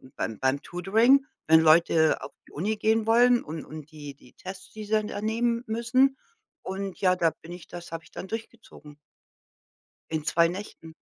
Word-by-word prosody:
beim 110 - -4
beim 130 +2 0
Tutoring 225 +10 +3 0.2
wenn 160 0 +7
Leute 160 0 +4
auf - - -8 0.2
die - - -18
Uni 205 +8 -2
gehen 220 +1 +1
wollen 240 +1 +5
und 155 +1 -7
und 155 -1 -10
die 145 -2 -9
die 125 - -20
Tests, 190 0 -10
die 215 0 -7
sie 210 - -13
dann 215 -1 +2
da - - -5
nehmen 230 +2 0
müssen. 240 +4 +2 0.5
Und 190 0 -5
ja, 185 -1 +4
da 165 -2 +2
bin 170 - -11
ich 175 - -11
das 175 -1 -10
habe 165 -1 -6
ich - - -20
dann 190 - -8
durchgezogen. 220 -9 -9 1.2
In 155 -2 -2
2 170 +1 +3
Nächten 175 -3 -8
185 Hz, 185 wpm, -26 LUFS, 160-225 Hz, 1.2 s, wenn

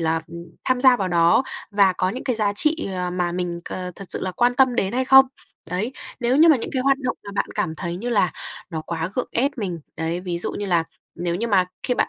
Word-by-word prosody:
là, 160 0 +1
ừm, 170 0 -9 0.2
tham 255 -1 +1
gia 255 -1 +6
vào 190 -4 -1
đó 170 +6 +4 0.3
và 200 -2 +4
có 185 0 0
những 250 +7 -5
cái 250 -4 0
giá 205 -2 +1
trị, 310 +8 0
ờ, 180 0 -2
mà 180 -1 -1
mình, 175 -1 -3
ờ, 180 -1 -5
thật 195 - -9
sự - - -4
là 185 - -2
quan 245 +5 +2
tâm 260 -2 +4
đến 195 -4 0
hay 260 +2 +1
không. 265 +1 +8 0.4
Đấy, 210 +8 -2 0.3
nếu 245 +2 +2
như 325 +2 +7
mà 310 - +7
những 230 - -5
cái 260 - 0
hoạt 275 +1 +3
động 260 - -2
mà 200 - -7
bạn 200 - 0
cảm 160 - -1
thấy 170 +1 -4
như 235 +6 -4
là 200 -7 +2 0.4
nó 160 - -3
quá 165 +2 -4
gượng 250 - -2
ép 265 +4 +2
mình, 185 -8 -3 0.2
đấy, 165 +2 -2
ví 180 -2 -3
dụ - - -2
như 205 - -4
là 170 -3 +2 0.3
nếu 170 0 -2
như 230 +6 -1
mà 195 -4 +3 0.2
khi 250 - 0
bạn - - +1
195 Hz, 265 wpm, -22 LUFS, 175-250 Hz, 0.4 s, không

